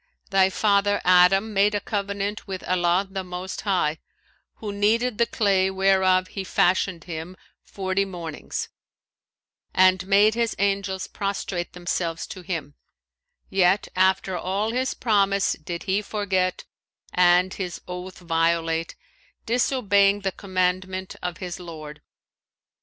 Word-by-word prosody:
Thy 190 -1 +4
father 205 +1 +2
Adam 185 +4 +5
made 205 +1 +3
a - - +1
covenant 200 +1 -3
with 190 -1 -5
Allah 180 +1 +1
the 190 0 -5
most 180 +1 -6
High, 180 -6 0 0.6
who 210 -2 -6
kneaded 220 +3 +1
the 235 - +3
clay 195 -4 +2
whereof 190 -1 +3
He 195 - -5
fashioned 180 -2 +1
him 175 +2 -7 0.2
forty 190 0 -2
mornings 170 -5 -6 1.1
and 185 0 +4
made 205 +2 +5
His 230 0 -1
angels 195 -1 -1
prostrate 195 -3 -4
themselves 175 -2 -3
to 185 - -8
him; 165 -5 -5 0.8
yet 190 +1 +3
after 190 0 +2
all 195 +5 -1
his 255 +1 -1
promise 200 -3 +2
did 170 +2 -6
he 195 +2 0
forget 195 -3 -1 0.5
and 180 +1 +4
his 180 -3 -5
oath 180 +1 -7
violate, 165 -1 0 0.5
disobeying 205 -5 +2
the 195 -1 -1
commandment 185 0 -2
of 180 -1 -4
his 180 -2 -6
Lord." 155 -4 -9
190 Hz, 125 wpm, -24 LUFS, 180-200 Hz, 1.1 s, Adam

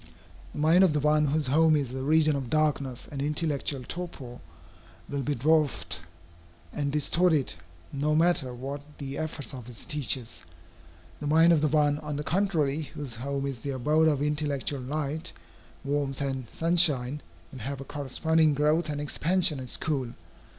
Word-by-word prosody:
The - - -9
mind 160 +5 +5
of 180 -5 +4
the 150 - +1
one 150 +1 +3
whose 150 +1 0
home 155 +4 +4
is 135 -4 -1
a 130 - -3
region 155 +1 +4
of 135 -4 -4
darkness 140 -4 0
and 140 -2 -4
intellectual 145 -2 0
torpor, 140 -9 -6 0.7
will 140 -1 -3
be 145 +2 -1
dwarfed 140 - +1 0.7
and 140 -1 -1
distorted, 150 0 +2 0.4
no 150 +2 +1
matter 160 -5 +2
what 135 +4 -6 0.2
the 140 -1 -5
efforts 155 -3 -4
of 125 -2 -8
its 115 - -8
teachers. 125 - -2 0.8
The 145 - -4
mind 165 +3 +6
of 155 - +3
the 155 - +3
one, 150 -1 +2
on 150 -1 -5
the 150 - -3
contrary, 160 -5 +1
whose 145 -4 -4
home 140 +3 -3
is 135 -4 -4
the 140 - -5
abode 150 +5 +2
of 145 -2 +2
intellectual 145 -2 -1
light, 150 +5 -3 0.5
warmth, 140 -1 -1
and 135 -4 -3
sunshine, 150 -5 +1 0.3
will 130 - -9
have 135 +4 -4
a - - -6
corresponding 150 +3 +1
growth 150 +3 +2
and 145 -1 -3
expansion 165 +2 +1
at 130 -1 -6
school. 135 -5 -2
145 Hz, 165 wpm, -28 LUFS, 135-155 Hz, 0.8 s, mind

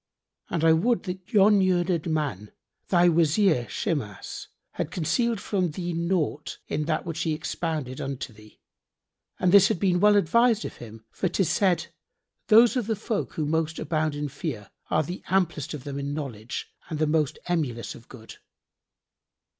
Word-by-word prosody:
And 165 -2 -1
I 165 0 +6
would 225 +9 +2
that 185 -2 -7
yon 205 0 +5
learned 175 -3 +1
man, 140 -11 -2 0.4
thy 175 -1 +4
Wazir 165 - +3
Shimas, 140 - -4 0.2
had - - -3
concealed 225 - 0
from 190 -4 -1
thee 175 +3 -4
naught 170 -3 -1
in 150 +1 -2
that 155 +1 -1
which 165 -1 -4
he 160 -2 0
expounded 155 -5 -3
unto 135 -3 -5
thee; 105 0 -18 0.8
and 180 - +3
this 200 -1 +8
had - - -1
been 180 -2 +2
well 210 +2 +5
advised 220 +4 +3
of - - -7
him, 110 -1 -11
for 185 - -1
'tis 180 -1 0
said, 175 -4 +2 0.6
'Those 230 +3 +6
of 245 -5 -1
the 220 - 0
folk 215 0 -3
who 155 - -2
most 160 +1 -1
abound 155 -1 -1
in 145 0 -2
fear 130 - -6 0.2
are 155 - +2
the 175 +5 -6
amplest 175 -6 0
of 140 - -9
them 140 -1 -5
in 140 +1 -3
knowledge 125 -7 -6 0.2
and 155 - -3
the 155 - +2
most 150 -2 +1
emulous 145 -10 -2
of 115 - -15
good.'" 115 -4 -12
165 Hz, 170 wpm, -26 LUFS, 145-185 Hz, 0.8 s, this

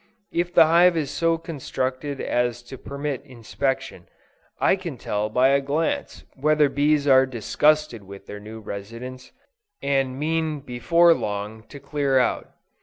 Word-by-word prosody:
If 175 +1 -1
the 170 - +7
hive 170 +2 +5
is 145 -3 -2
so 165 +3 +1
constructed 140 -3 -4
as 120 0 -1
to 120 - -10
permit 140 -1 -4
inspection, 130 +1 -4 0.5
I - - +4
can 175 -8 -7
tell 105 -1 -2
by 125 +4 +3
a 140 0 +3
glance 145 +4 -2
whether 150 +1 +3
bees 145 +1 +2
are 130 -1 +6
disgusted 130 +1 +1
with 100 0 -12
their 105 - -8
new 110 +2 -10
residence, 115 +6 -8 0.5
and 135 -2 0
mean 155 0 -1
before 165 +7 +3
long 105 -4 -4
to 140 - -11
clear 140 -1 0
out. 125 - +1
135 Hz, 145 wpm, -24 LUFS, 120-155 Hz, 0.5 s, the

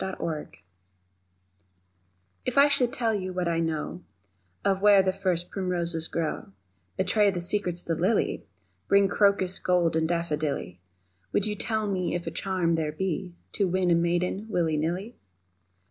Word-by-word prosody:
The 190 - -3
Secret 155 -3 -5 1.9
IF - - -2
I 280 +1 +8
should 250 -4 +2
tell 235 -4 0
you 185 -3 -3
what 180 -1 -1
I 165 -1 +1
know 160 +1 -2 0.6
Of 195 -1 +2
where 205 -1 +6
the 190 0 +1
first 185 -3 -1
primroses 175 -4 -1
grow, 160 -11 -3 0.4
Betray 200 +2 +4
the 185 -3 -2
secrets 175 -1 -1
of - - -22
the 165 -1 -1
lily, 200 +4 +1 0.4
Bring 200 0 +5
crocus 200 -2 +2
gold 175 -3 +2
and 160 0 +1
daffodilly, 155 - -2 0.5
Would 205 - +2
you 210 - -1
tell 220 +1 -1
me 185 -3 -1
if 175 - -4
charm 185 -4 0
there 160 -2 0
be 180 +2 -3 0.2
To 200 - 0
win 180 0 +1
a - - +6
maiden, 175 +4 0
willy 165 -6 +1
nilly? 175 +9 -2
180 Hz, 155 wpm, -27 LUFS, 170-200 Hz, 1.9 s, I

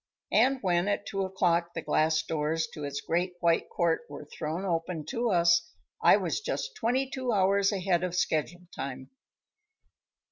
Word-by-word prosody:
And 270 +1 +4
when 175 0 +2
at 205 0 -1
two 195 - -3
o'clock 175 -2 0
the 165 - -2
glass 155 0 +2
doors 160 +1 -1
to 150 - -7
its 145 0 -4
great 180 +2 -1
white 170 -1 +2
court 170 -2 +1
were 145 +1 -8
thrown 160 +5 -4
open 165 -3 -2
to 235 0 0
us, 170 -2 +3 0.3
I - - +7
was - - -2
just - - -3
twenty 255 +4 0
two 260 -2 -3
hours 200 0 +3
ahead 185 -3 0
of 180 -1 -2
schedule 175 +1 -1
time. 130 -1 -6
175 Hz, 165 wpm, -29 LUFS, 160-195 Hz, 0.3 s, I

